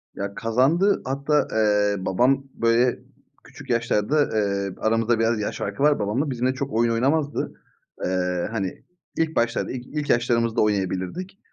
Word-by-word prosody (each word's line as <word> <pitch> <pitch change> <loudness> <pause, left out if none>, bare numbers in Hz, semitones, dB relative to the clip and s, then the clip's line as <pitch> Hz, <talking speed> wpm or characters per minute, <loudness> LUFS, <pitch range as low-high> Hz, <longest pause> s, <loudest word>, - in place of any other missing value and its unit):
Ya 100 0 -5
kazandı. 135 - +2
Hatta, 140 +2 +1
eee, 105 -2 +2
babam 130 +8 +2
böyle 115 +2 +2 0.4
küçük 140 0 -14
yaşlarda, 120 +4 +1
eee, 100 -2 -1
aramızda 115 +1 +1
biraz 115 -1 +2
yaş 105 - -3
farkı 100 +7 -3
var 150 -5 +4
babamla, 110 +9 -1
bizimle 125 0 0
çok 140 0 -4
oyun 115 +1 +2
oynamazdı. 140 +6 0 0.5
Eee, 90 -1 -1
hani 95 -5 -4 0.3
ilk 160 -1 0
başlarda 115 0 0
ilk 125 -1 -6
ilk 150 -1 -4
yaşlarımızda 115 -1 +2
oynayabilirdik. 105 - -2
115 Hz, 140 wpm, -24 LUFS, 105-135 Hz, 0.5 s, var